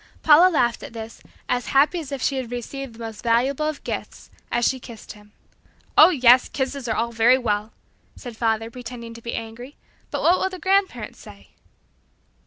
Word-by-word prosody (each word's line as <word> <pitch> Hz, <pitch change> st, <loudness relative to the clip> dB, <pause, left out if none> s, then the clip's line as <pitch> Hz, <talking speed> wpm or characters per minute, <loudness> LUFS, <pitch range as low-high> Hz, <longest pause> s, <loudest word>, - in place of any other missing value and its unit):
Paula 320 Hz, +4 st, +7 dB
laughed 240 Hz, -9 st, +1 dB
at -, -, -9 dB
this, 225 Hz, -1 st, -9 dB, 0.3 s
as 250 Hz, 0 st, -1 dB
happy 305 Hz, +6 st, +4 dB
as 300 Hz, -4 st, -8 dB
if 275 Hz, -2 st, -4 dB
she 275 Hz, -, 0 dB
had 255 Hz, -3 st, -4 dB
received 245 Hz, +1 st, -6 dB
the 230 Hz, 0 st, -8 dB
most 225 Hz, -2 st, -8 dB
valuable 255 Hz, +6 st, +1 dB
of 310 Hz, -2 st, -5 dB
gifts, -, -, -6 dB, 0.2 s
as 240 Hz, 0 st, +2 dB
she 260 Hz, -, -1 dB
kissed 235 Hz, -3 st, -11 dB
him. 210 Hz, 0 st, -16 dB, 0.6 s
"Oh, -, -, +9 dB
yes; 255 Hz, -6 st, +5 dB
kisses 265 Hz, -1 st, -3 dB
are 225 Hz, -, -1 dB
all 235 Hz, 0 st, -1 dB
very 235 Hz, +3 st, +4 dB
well," 215 Hz, -3 st, -2 dB, 0.4 s
said 245 Hz, -3 st, -9 dB
father, 225 Hz, 0 st, -1 dB
pretending 235 Hz, -1 st, -9 dB
to 230 Hz, -, -12 dB
be 235 Hz, -, -5 dB
angry, 230 Hz, +5 st, -8 dB, 0.3 s
"but -, -, -3 dB
what 355 Hz, +2 st, +4 dB
will 380 Hz, -, 0 dB
the 370 Hz, -, -8 dB
grandparents 385 Hz, +2 st, 0 dB
say?" -, -, -14 dB
245 Hz, 190 wpm, -23 LUFS, 230-280 Hz, 0.6 s, Oh